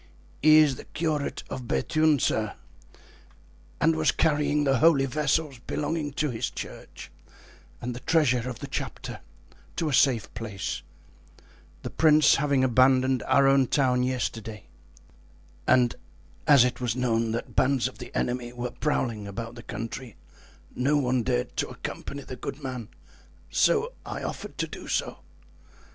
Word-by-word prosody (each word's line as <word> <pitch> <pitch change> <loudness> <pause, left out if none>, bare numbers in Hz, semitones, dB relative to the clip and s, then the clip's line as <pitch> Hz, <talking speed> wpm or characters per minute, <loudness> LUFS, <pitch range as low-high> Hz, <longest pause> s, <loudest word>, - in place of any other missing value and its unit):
"He 155 +1 +7
is 150 -5 +5
the - - -10
curate 155 -3 -2
of 125 -2 -6
Bethune, 155 - +2
sir, 110 -4 0 1.2
and 80 - +3
was 80 0 +2
carrying 150 -1 +1
the 135 -3 +2
holy 145 -2 +5
vessels 150 0 0
belonging 150 +3 -3
to 150 0 -1
his 115 +1 -2
church, - - -9 0.7
and 125 +1 -4
the - - -6
treasure 130 -6 +2
of 120 - -6
the - - -4
chapter, - - -5 0.6
to 160 - -1
a - - -2
safe 125 -6 +3
place, 105 -5 -4 1.0
the - - -5
prince 155 -2 +5
having 140 -2 +2
abandoned 130 0 +4
our 135 0 +5
town 125 -2 +2
yesterday; 115 -4 -3 1.0
and 125 -2 +4 0.5
as 135 -4 +8
it 125 0 -2
was 120 -2 -1
known 115 -3 +1
that 115 - -5
bands 130 -2 +2
of 130 - -11
the - - -9
enemy 120 -1 -2
were 125 0 -5
prowling 115 -8 -2
about 115 +3 -6
the 120 - -10
country, 115 +2 -6 0.6
no 140 +4 +2
one 130 -3 +1
dared - - -1
to - - -1
accompany 140 0 -6
the 130 - -8
good 140 +3 -7
man, 125 -4 -5 0.6
so 470 +2 +2
I - - -6
offered - - -6
to - - -1
do - - -9
so. - - -2
130 Hz, 145 wpm, -26 LUFS, 120-145 Hz, 1.2 s, as